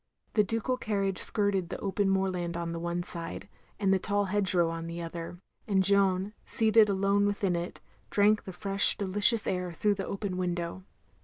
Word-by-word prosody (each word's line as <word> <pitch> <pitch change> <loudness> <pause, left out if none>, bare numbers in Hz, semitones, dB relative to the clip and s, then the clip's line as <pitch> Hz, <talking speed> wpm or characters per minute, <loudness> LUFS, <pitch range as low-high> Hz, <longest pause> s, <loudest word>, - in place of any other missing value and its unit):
The 210 - +4
ducal 230 +4 -2
carriage 195 -5 -1
skirted 200 -4 +1
the - - -5
open 200 0 -1
moorland 185 -3 -1
on 170 -1 -4
the 165 - -5
one 170 +1 -3
side, 170 +2 -6 0.3
and 195 -2 +2
the 190 - +2
tall 205 +2 0
hedge 195 -1 +1
row 170 -2 +2
on 165 0 -6
the 170 +1 -6
other, 170 +1 -7 0.3
and 195 -3 +2
Jeanne 195 0 +2
seated 220 -2 +3
alone 200 +1 +2
within 200 -3 -1
it, 170 +1 -5 0.3
drank 210 +1 +2
the 190 - -6
fresh 195 +2 +3
delicious 205 +3 +3
air 180 -1 -2
through 205 +5 +1
the 195 -1 -5
open 195 -2 -4
window. 175 0 -3
195 Hz, 180 wpm, -29 LUFS, 175-205 Hz, 0.3 s, The